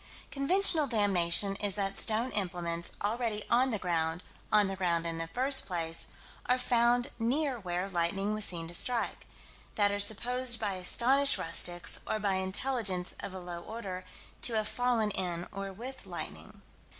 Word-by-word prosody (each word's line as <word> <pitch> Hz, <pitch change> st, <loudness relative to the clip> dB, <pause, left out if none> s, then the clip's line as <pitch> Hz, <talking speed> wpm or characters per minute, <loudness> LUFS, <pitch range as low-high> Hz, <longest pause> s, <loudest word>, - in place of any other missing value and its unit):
Conventional 315 Hz, +2 st, +3 dB
damnation 200 Hz, -4 st, +2 dB
is 205 Hz, -2 st, +2 dB
that 195 Hz, -1 st, -2 dB
stone 225 Hz, +5 st, +2 dB
implements, 170 Hz, -3 st, -3 dB
already 220 Hz, 0 st, -1 dB
on 250 Hz, +3 st, +3 dB
the 220 Hz, -, -1 dB
ground 170 Hz, -2 st, -2 dB, 0.3 s
"on 210 Hz, -1 st, +4 dB
the 195 Hz, -, -4 dB
ground 170 Hz, -3 st, -1 dB
in 165 Hz, -1 st, -3 dB
the 165 Hz, -, -3 dB
first 265 Hz, +8 st, +2 dB
place" 165 Hz, -3 st, -1 dB, 0.4 s
are 250 Hz, -, +2 dB
found 245 Hz, 0 st, +1 dB
near 260 Hz, +3 st, -1 dB
where 180 Hz, -1 st, -3 dB
lightning 195 Hz, +3 st, -1 dB
was 215 Hz, 0 st, -2 dB
seen 170 Hz, -4 st, 0 dB
to 170 Hz, -, -10 dB
strike: 235 Hz, +6 st, 0 dB, 0.5 s
that 205 Hz, -1 st, +2 dB
are 205 Hz, -, -2 dB
supposed 240 Hz, +4 st, +2 dB
by 205 Hz, -3 st, -2 dB
astonished 255 Hz, +9 st, +3 dB
rustics, 175 Hz, +1 st, +4 dB
or -, -, -1 dB
by 205 Hz, -2 st, -1 dB
intelligence 190 Hz, -1 st, -1 dB
of -, -, -5 dB
a 185 Hz, -, -7 dB
low 175 Hz, -1 st, -7 dB
order, 190 Hz, -3 st, -7 dB, 0.4 s
to 240 Hz, -, +2 dB
have 215 Hz, -1 st, 0 dB
fallen 240 Hz, -4 st, 0 dB
in 175 Hz, -3 st, -2 dB
or 195 Hz, 0 st, -6 dB
with 250 Hz, +7 st, -8 dB
lightning. -, -, -8 dB
205 Hz, 160 wpm, -30 LUFS, 180-240 Hz, 0.5 s, on